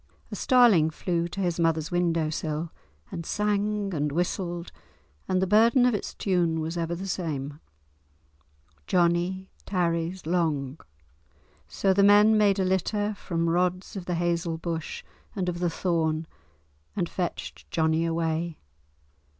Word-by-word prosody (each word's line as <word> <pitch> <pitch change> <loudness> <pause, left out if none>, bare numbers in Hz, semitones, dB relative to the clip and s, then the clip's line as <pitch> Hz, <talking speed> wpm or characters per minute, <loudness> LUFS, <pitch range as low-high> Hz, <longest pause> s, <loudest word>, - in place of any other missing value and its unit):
A - - -4
starling 235 - +5
flew 170 +1 -2
to 185 +3 -5
his 175 -2 -1
mother's 165 -1 +1
window 170 -3 +1
sill, 155 +1 -3 0.4
and 170 - -5
sang 210 +1 -1
and 150 -2 -1
whistled, 175 +1 -2 0.6
and 185 - +1
the 190 - +2
burden 230 +6 +5
of 250 - +3
its 205 - -4
tune 175 -4 +1
was 160 +2 -3
ever 170 0 -2
the 190 +3 -6
same. 150 -6 -3 1.3
"Johnie 175 +2 +1 0.2
tarries 170 -1 -1
long." 155 -5 -1 0.9
So 195 -1 +1
the 200 - +3
men 205 +2 +6
made 205 -2 +4
a 190 - +1
litter 205 +3 0
from 170 -4 -2
rods 180 +3 0
of 190 -3 -5
the 180 - -1
hazel 170 -1 -1
bush 165 -1 -4 0.3
and 185 -3 -2
of 175 -1 -2
the 175 -1 +1
thorn 160 -2 0 0.7
and - - 0
fetched 75 0 -5
Johnie 160 - +1
away. 165 0 -1
175 Hz, 140 wpm, -27 LUFS, 165-190 Hz, 1.3 s, men